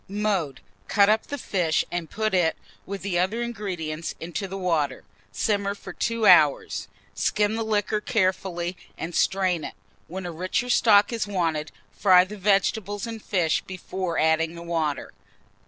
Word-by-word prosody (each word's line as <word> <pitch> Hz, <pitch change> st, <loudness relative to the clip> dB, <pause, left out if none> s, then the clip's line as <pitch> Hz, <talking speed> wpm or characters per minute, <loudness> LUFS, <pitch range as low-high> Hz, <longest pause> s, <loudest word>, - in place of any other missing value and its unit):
Mode. 195 Hz, -8 st, -1 dB, 0.3 s
Cut 200 Hz, -1 st, +4 dB
up 220 Hz, +1 st, +2 dB
the 285 Hz, -, -4 dB
fish, 175 Hz, -, 0 dB
and 175 Hz, -3 st, -3 dB
put 215 Hz, -1 st, -1 dB
it, 175 Hz, -3 st, +2 dB, 0.3 s
with 195 Hz, 0 st, -5 dB
the 185 Hz, -3 st, 0 dB
other 210 Hz, +6 st, 0 dB
ingredients, 180 Hz, -9 st, -4 dB
into 175 Hz, +4 st, -4 dB
the 195 Hz, +1 st, -6 dB
water. 165 Hz, -6 st, 0 dB, 0.3 s
Simmer 200 Hz, -1 st, 0 dB
for -, -, -10 dB
2 230 Hz, -1 st, -1 dB
hours; 145 Hz, -, +5 dB, 0.3 s
skim 205 Hz, -, +1 dB
the 225 Hz, -, -2 dB
liquor 210 Hz, -1 st, 0 dB
carefully, 185 Hz, -5 st, -1 dB, 0.2 s
and 170 Hz, +2 st, -5 dB
strain 185 Hz, -4 st, +1 dB
it. -, -, -6 dB, 0.3 s
When 185 Hz, +2 st, -6 dB
a 175 Hz, -, -4 dB
richer 185 Hz, +9 st, -1 dB
stock 210 Hz, -2 st, +5 dB
is 225 Hz, -2 st, -1 dB
wanted, 165 Hz, -6 st, -1 dB, 0.2 s
fry 180 Hz, -, +5 dB
the 195 Hz, +3 st, -8 dB
vegetables 205 Hz, +1 st, +1 dB
and 225 Hz, -1 st, -6 dB
fish 175 Hz, -7 st, +1 dB
before 185 Hz, -2 st, -4 dB
adding 160 Hz, +1 st, +2 dB
the 170 Hz, -, -8 dB
water. 160 Hz, -4 st, -2 dB
190 Hz, 155 wpm, -25 LUFS, 170-210 Hz, 0.3 s, hours